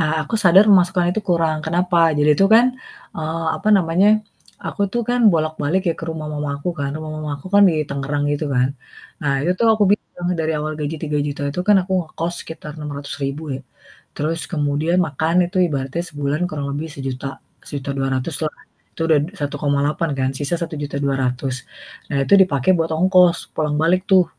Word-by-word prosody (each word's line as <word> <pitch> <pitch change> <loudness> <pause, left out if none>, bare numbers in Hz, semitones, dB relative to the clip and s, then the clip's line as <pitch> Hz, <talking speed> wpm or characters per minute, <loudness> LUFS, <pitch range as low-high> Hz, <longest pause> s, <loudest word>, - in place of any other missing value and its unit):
A 155 0 0
aku 230 - -5
sadar 190 +3 +7
pemasukan 180 -2 +4
itu 215 - -1
kurang. 165 -2 +2
Kenapa? 170 -1 +2
Jadi 150 +1 +3
itu 195 - +4
kan, 235 +2 +7 0.5
eee, 160 +1 -3
apa - - -2
namanya. 180 +2 +3 0.6
Aku - - -2
tuh 240 - 0
kan 245 0 +1
bolak-balik 155 +2 0
ya - - -2
ke - - -6
rumah 160 -1 -5
mama 145 -1 -3
aku 160 +5 -3
kan. 140 - -1
Rumah 155 0 -6
mama 155 -1 -5
aku 140 - -13
kan 205 - +7
di 170 - +1
Tangerang 140 +1 -2
gitu 145 +1 -2
kan. 125 0 +3 0.5
Nah 145 -2 +1
itu 175 - +2
tuh 230 - +2
aku 215 -1 +2
bilang 180 -3 -2
dari 160 0 0
awal 155 +1 -3
gaji 150 +2 -3
Rp3.000.000 145 -2 -2
itu 160 - -3
kan 205 - +7
aku 190 +1 -6
ngekos 165 +1 -4
sekitar 155 -2 -8
Rp600.000 140 0 -5
ya, - - -4 0.6
terus 160 +3 -1
kemudian 150 +2 0
makan 160 +5 +1
itu 185 +2 -3
ibaratnya 135 -1 -3
sebulan 145 0 -2
kurang 145 -2 -4
lebih 150 +3 -3
Rp1.000.000, 135 0 -4 0.4
Rp1.200.000 135 0 -2
lah. 150 - -5 0.4
Itu - - -14
udah 155 - +6 0.2
Rp1.800.000 145 +2 -1
kan, 130 0 +1
sisa 145 +4 -1
Rp1.200.000. 140 -4 -2 0.6
Nah 140 - 0
itu 200 - +4
dipakai 145 -2 +1
buat 165 0 0
ongkos 180 +1 +3
pulang 150 -1 -1
balik 180 +3 +3
tuh 185 -2 +6
155 Hz, 175 wpm, -20 LUFS, 145-175 Hz, 0.6 s, sadar